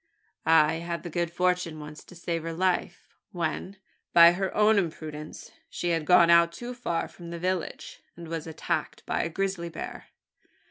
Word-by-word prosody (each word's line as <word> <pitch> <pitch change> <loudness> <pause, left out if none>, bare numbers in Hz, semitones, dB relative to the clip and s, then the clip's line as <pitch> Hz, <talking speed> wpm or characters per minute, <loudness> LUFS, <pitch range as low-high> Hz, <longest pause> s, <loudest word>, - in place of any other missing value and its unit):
I 160 0 +5
had 170 0 -4
the 175 - -6
good 170 0 -1
fortune 180 -2 0
once 150 0 -9
to 180 - -14
save 170 -1 -3
her 165 +1 -4
life 180 0 -1 0.2
when, 175 +3 -3 0.4
by 170 0 +9
her 190 +1 -2
own 210 0 +5
imprudence, 155 -3 -6 0.2
she 175 - -3
had 165 -2 0
gone 170 0 +6
out 170 0 +6
too 240 +8 -7
far 205 -9 -2
from 170 -1 -11
the 170 - -5
village, 180 0 -3 0.2
and 170 -1 -9
was 165 0 -5
attacked 160 - -3
by - - 0
a - - -2
grizzly 190 -1 -2
bear. - - -7
170 Hz, 175 wpm, -27 LUFS, 165-180 Hz, 0.4 s, by